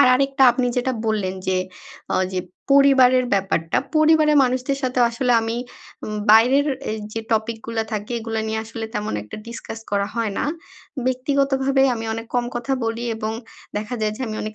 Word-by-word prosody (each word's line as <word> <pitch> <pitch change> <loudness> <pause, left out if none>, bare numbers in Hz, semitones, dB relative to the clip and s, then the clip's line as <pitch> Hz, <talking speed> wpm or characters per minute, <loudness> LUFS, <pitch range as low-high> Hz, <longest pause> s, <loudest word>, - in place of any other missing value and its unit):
আর 280 - +7
আরেকটা 275 +1 +1
আপনি 245 0 0
যেটা 255 +1 0
বললেন 200 -4 0
যে, 185 0 +1 0.6
অ - - +2 0.2
যে 185 - -1 0.3
পরিবারের 260 -2 +6
ব্যাপারটা। 190 -4 0 0.2
পরিবারের 310 -1 +5
মানুষদের 255 +2 -1
সাথেও 250 -1 +2
আসলে 245 +1 0
আমি 225 +1 -2 0.5
উম 215 0 -4
বাইরের 255 +7 +6 0.2
এই 220 - -3
যে 225 - -3
টপিকগুলা 225 0 -1
থাকে 210 +3 -3
এগুলা 225 -1 -3
নিয়ে 220 0 -1
আসলে 225 0 -6
তেমন 210 0 -2
একটা 105 - -9
ডিসকাস 230 -1 -7
করা 200 0 +1
হয় 225 -3 -1
না। - - 0 0.6
ব্যক্তিগতভাবে 270 +1 +1
আমি 225 -1 -5
অনেক 225 0 -6
কম 245 - +2
কথা 245 +3 -2
বলি 230 +1 -2
এবং 220 0 -3 0.4
দেখা 215 +4 -3
যায় 215 -1 0
যে - - -12
আমি 215 -1 -4
অনেক 215 0 -5
230 Hz, 175 wpm, -22 LUFS, 220-260 Hz, 0.6 s, আর